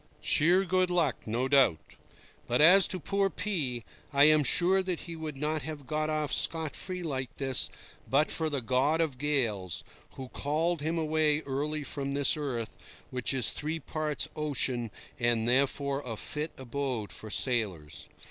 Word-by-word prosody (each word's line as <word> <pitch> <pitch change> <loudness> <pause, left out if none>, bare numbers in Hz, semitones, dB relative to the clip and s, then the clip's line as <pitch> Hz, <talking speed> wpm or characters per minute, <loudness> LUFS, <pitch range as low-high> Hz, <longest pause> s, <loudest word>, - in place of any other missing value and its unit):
Sheer 180 +6 +3
good 185 0 +1
luck, 170 -10 0
no 120 +4 -1
doubt. 135 - +2 0.5
But 120 - +1
as 180 +5 +7
to 185 - -3
poor 195 +4 0
P—, 145 - -3 0.3
I 140 0 +4
am 155 0 +6
sure 180 +7 +5
that 185 -2 -3
he 170 - -7
would 155 -3 -6
not 155 +2 -1
have 150 -2 -7
got 155 +2 -1
off 155 -2 -1
scot 160 -3 0
free 185 -1 -4
like 135 -4 -4
this 135 -3 +2 0.4
but 145 +3 +2
for 160 -1 -1
the 140 -3 -2
god 135 +6 +1
of 150 -6 -1
gales, 115 - -1 0.3
who 130 -1 -8
called 155 +4 -1
him 160 +3 -1
away 155 -1 +1
early 145 +2 -3
from 140 0 -3
this 140 -1 +3
earth, 125 -7 -4 0.3
which 125 -1 +2
is 130 -3 +2
three 155 +2 -4
parts 155 +2 -2
ocean, 130 -6 0 0.3
and 120 -1 +1
therefore 140 +2 +1
a 115 -3 -5
fit 150 +7 -3
abode 130 -4 -3
for 110 - -7
sailors. 100 - 0
145 Hz, 165 wpm, -29 LUFS, 130-160 Hz, 0.5 s, as